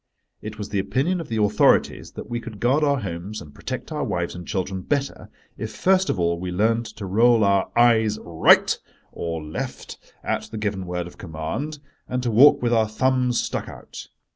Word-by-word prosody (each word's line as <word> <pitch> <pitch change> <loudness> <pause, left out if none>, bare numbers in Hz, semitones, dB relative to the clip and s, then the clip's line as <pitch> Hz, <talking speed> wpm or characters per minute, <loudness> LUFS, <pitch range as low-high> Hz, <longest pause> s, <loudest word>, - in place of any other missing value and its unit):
It 110 0 -7
was 105 -1 -6
the 100 - -1
opinion 165 - 0
of 165 - -8
the 115 - -3
authorities 105 0 +2
that - - -8
we 120 - -3
could 110 -3 -9
guard 130 +7 +2
our 140 -3 +2
homes 95 +3 -5
and 75 -8 -12
protect - - -6
our - - -2
wives - - -2
and 90 0 -9
children 95 0 -2
better 140 +5 -2 0.3
if 110 -1 -5
first 190 0 +2
of 95 - 0
all 85 0 +1
we 90 0 -4
learned 115 +5 +1
to 105 - -6
roll 115 +4 +4
our 100 -1 +2
"eyes 110 -3 +4
right" 85 -2 +4 0.4
or 85 -2 -4
left 75 0 -6 0.2
at - - -2
the 110 - -6
given 100 -3 -3
word 90 -1 -3
of 85 - -13
command, 90 - -4 0.3
and 125 0 -2
to 120 - 0
walk 140 +4 +6
with 120 0 +2
our 110 -2 +2
thumbs 125 +1 +1
stuck - - -4
out. - - -10
110 Hz, 195 wpm, -23 LUFS, 95-125 Hz, 0.4 s, walk